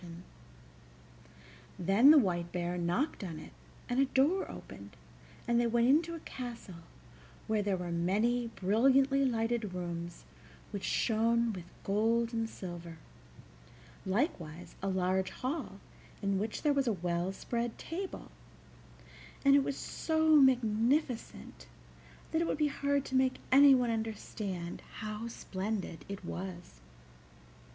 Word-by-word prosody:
Then 195 +9 +5
the 310 - +9
White 175 -8 +1
Bear 175 0 -2
knocked 180 - -1
on 165 -4 -5
it, - - -10 0.4
and 245 +1 0
a 275 - +5
door 285 +8 +2
opened, 100 +1 -10 0.5
and 235 0 +3
they 240 - +2
went 235 +1 +3
into 330 +4 +3
a - - -7
castle 235 -9 -8 0.6
where 215 -1 +1
there 200 -2 0
were 180 -1 -4
many 215 +8 +1
brilliantly 265 +7 +3
lighted 225 -5 0
rooms 175 -1 -5 0.5
which - - -4
shone 230 - +2
with 180 -3 -7 0.2
gold 225 +3 +1
and 225 -1 -1
silver, 175 -4 -8 1.1
likewise 180 - -2
a 195 - -2
large 185 0 +1
hall 255 - -4 0.4
in 200 -1 +1
which 215 +2 -3
there 295 -2 +3
was 275 -2 +1
a 230 - +3
well 175 0 -1
spread 235 +4 -3
table, 370 +3 -6 1.1
and 275 - +7
it 280 - +5
was 275 - -3
so 315 -1 +1
magnificent 245 - +2 0.6
that 320 - +1
it 335 - 0
would - - -1
be 300 -1 +2
hard 280 0 0
to 265 - -4
make 260 0 +3
anyone 265 -3 +6
understand 210 -5 -4
how 215 +1 -5
splendid 195 -5 -4
it 195 -2 -6
was. 175 - -7
225 Hz, 130 wpm, -32 LUFS, 185-265 Hz, 1.1 s, the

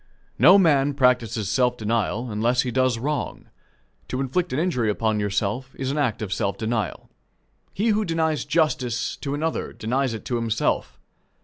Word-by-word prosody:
No 175 +10 +8
man 145 -6 +3
practices 125 -5 +2
self 125 +4 +1
denial 115 +1 -1
unless 120 +4 +1
he 125 - -3
does 130 -1 +2
wrong. 145 +5 -3 0.6
To 130 - -3
inflict 150 +7 -1
an 130 - -1
injury 140 -10 +1
upon 110 0 0
yourself 105 +5 -2
is 130 0 -2
an 150 - -2
act 120 -6 0
of 100 -2 -3
self 100 -1 -1
denial. 110 -3 -3 0.6
He 220 +4 0
who 215 0 +2
denies 160 -4 0
justice 130 -7 0
to 140 -1 -3
another 160 +2 -2
denies 125 +2 -1
it 110 - -9
to 120 - -1
himself. 115 -1 -1
125 Hz, 165 wpm, -24 LUFS, 110-145 Hz, 0.6 s, No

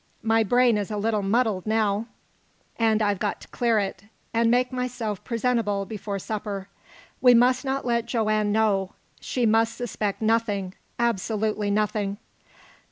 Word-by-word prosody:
My 225 0 +3
brain 240 +1 +3
is 200 - -3
a 210 - -3
little 215 0 0
muddled 210 -1 0
now, 215 0 +1 0.7
and 220 -1 +3
I've 205 -2 +1
got 210 - -2
to - - -12
clear 235 -2 +1
it, 195 -1 -2 0.3
and 230 0 +3
make 250 +2 +2
myself 245 -5 -3
presentable 230 -4 0
before 205 0 -5
supper. 200 -1 -5 0.5
We 250 -1 +7
must 250 +2 +4
not 270 -1 -2
let 235 -1 0
Joanne 215 -3 +1
know. 205 -3 +1 0.3
She 250 -2 -1
must 225 +1 +3
suspect 215 -4 -3
nothing 215 -4 0 0.2
absolutely 215 -2 0
nothing." 205 -1 0
220 Hz, 145 wpm, -25 LUFS, 205-235 Hz, 0.7 s, We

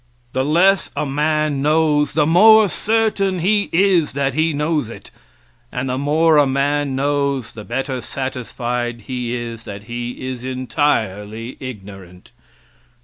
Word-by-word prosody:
The 130 - 0
less 180 +7 +3
a - - -1
man 150 0 0
knows 150 0 +2
the 150 -2 +2
more 215 +6 +6
certain 210 -2 0
he 200 +4 +1
is 180 -4 +2
that 140 -1 -1
he 160 +3 +1
knows 150 -3 -1
it, - - -11 0.6
and 125 +1 -3
the 130 - -1
more 155 +3 +3
a 145 -1 +5
man 140 +1 0
knows 140 -2 -1
the 105 - -9
better 130 +3 -3
satisfied 120 -1 -4
he 125 +1 -4
is 115 -1 -6
that 100 0 -8
he 120 +2 -5
is 125 -2 -5
entirely 120 -4 -2
ignorant. 95 -7 -10
140 Hz, 140 wpm, -19 LUFS, 120-155 Hz, 0.6 s, more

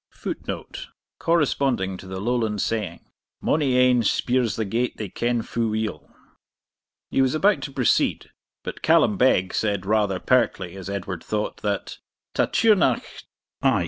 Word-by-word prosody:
[Footnote: - - -6 0.3
Corresponding 135 - +1
to 95 - -11
the 95 0 -5
Lowland 110 -1 0
saying, 100 -6 -2 0.3
'Mony 140 -5 +1
ane 125 -1 +5
speirs 120 0 +1
the 110 - -1
gate 120 +5 -1
they 105 -3 -5
ken 120 +4 -1
fu' 115 -1 -1
weel.'] 110 0 -3 1.0
He - - +2
was 130 +2 +2
about 200 +6 +3
to 140 - -5
proceed, 130 -4 +1 0.3
but - - -6
Callum - - +4
Beg 90 0 +3
said, 100 -3 -1
rather 105 -2 +1
pertly, 95 -8 +1
as 95 0 -7
Edward 100 -3 -4
thought, 105 0 -2
that 100 -2 -3 0.3
'Ta - - +2
Tighearnach 220 -3 +3 0.6
(i. - - +3
110 Hz, 145 wpm, -24 LUFS, 100-125 Hz, 1.0 s, ane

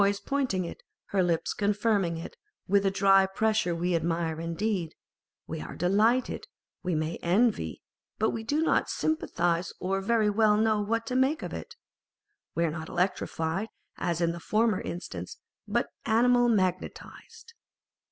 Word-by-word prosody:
nose 200 0 +3
pointing 260 -10 -1
it, 170 - -7
and 200 - -5
her - - +6
lips 170 -2 0
confirming 205 -4 +1
it 165 - -8 0.3
with 200 +1 +3
a - - +5
dry 195 0 +5
pressure 215 -3 +1
â€" - - -6
we 175 0 +1
admire 165 -1 -1
indeed, 170 0 -2 0.5
we - - -5
are 80 - -7
delighted, 215 +8 +2 0.3
we 180 -3 -1
may 155 +1 -1
envy, 185 - +1 0.3
but 220 - +2
we 225 - -4
do 295 +7 +1
not - - +2
sympathise 175 - 0
or 195 +1 -1
very 220 +1 +2
well 210 0 +4
know 215 -1 +2
what 230 +2 -1
to 250 - -3
make 265 +5 +2
of - - -5
it. - - -7 0.8
We 170 - +2
are 160 - 0
not 160 +1 -6
electrified, 180 0 -1 0.3
as 170 -1 -1
in 170 -1 +2
the 170 - -6
former 215 +2 +1
instance, 175 - -6 0.3
but - - 0
animal 245 +2 +4
magnetised. 205 - -3
195 Hz, 160 wpm, -28 LUFS, 170-225 Hz, 0.8 s, her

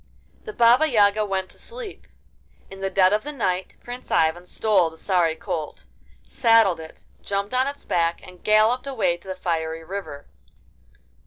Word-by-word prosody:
The 430 - -5
Baba 240 - +5
Yaga 215 -5 +3
went 190 -2 -2
to - - -14
sleep. 475 -3 -9 0.6
In 195 - -10
the 195 0 -2
dead 190 0 +4
of 215 - +1
the 295 - -5
night 190 -9 -2
Prince 245 +1 -9
Ivan 165 +2 +1
stole 195 -4 +2
the 160 - -16
sorry 170 -2 +1
colt, 155 - -5 0.4
saddled 225 - +3
it, 160 0 -12 0.2
jumped 200 +2 -3
on 255 +1 +2
its 285 0 -6
back, 170 -1 0
and 180 -1 -15
galloped 220 +5 +3
away 225 -10 0
to 175 - -20
the 190 - -4
fiery 165 -3 -3
river. 180 -5 -7
195 Hz, 165 wpm, -23 LUFS, 170-230 Hz, 0.6 s, Baba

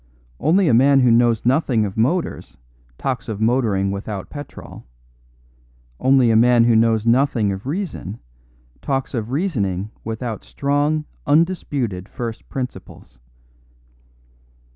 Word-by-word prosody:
Only 175 +6 +3
a 130 - +3
man 135 +3 +5
who 125 -2 +4
knows 115 -1 +3
nothing 125 -4 +2
of 95 - -5
motors 145 +11 -1 0.4
talks 130 -2 -3
of 105 -2 -4
motoring 110 -4 +1
without 100 0 -6
petrol; 145 0 -10 1.2
only 130 -3 +4
a - - +3
man 120 +1 +5
who 115 -1 +4
knows 110 -1 +3
nothing 120 -3 +2
of 95 +5 -6
reason 150 - -4 0.6
talks 135 -1 -2
of 115 -3 -3
reasoning 110 - -2
without 115 0 -5
strong, 145 +2 -1 0.2
undisputed 145 - 0
first 115 -2 -6
principles. 125 - -7
120 Hz, 120 wpm, -20 LUFS, 110-140 Hz, 1.2 s, man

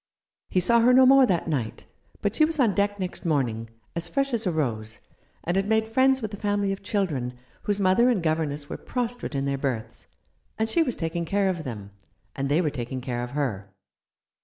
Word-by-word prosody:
He 185 - +2
saw 235 +6 +4
her 245 +2 +5
no 260 0 +7
more 265 0 +7
that 175 -5 0
night, 130 -9 -3 0.4
but 205 - +1
she 310 - +3
was 310 0 +1
on 230 -6 +4
deck 205 0 0
next 185 0 -4
morning, 120 - 0 0.3
as 170 0 -2
fresh 275 -1 -1
as 225 -3 0
a - - +2
rose, 110 -9 -2 0.5
and 175 - -1
had 195 +1 +1
made 220 0 +1
friends 265 +1 +3
with 215 -1 -4
a - - -5
family 205 -1 0
of 195 - -4
children, 160 - -1 0.3
whose 205 -1 0
mother 200 +6 +4
and 215 -9 +1
governess 155 -3 -1
were - - -5
prostrate 245 - -4
in 135 0 0
their 140 -1 -1
berths, 125 -6 -4 0.5
and 220 - +1
she 335 - +3
was 255 -7 0
taking 165 +1 -2
care 195 +2 +1
of 175 -4 -3
them, 105 -5 -6 0.4
and 135 0 -2
they 150 +5 +3
were 155 -4 0
taking 130 -1 -4
care 125 -1 -3
of 120 - -5
her. 105 -9 -2
180 Hz, 210 wpm, -26 LUFS, 135-220 Hz, 0.5 s, no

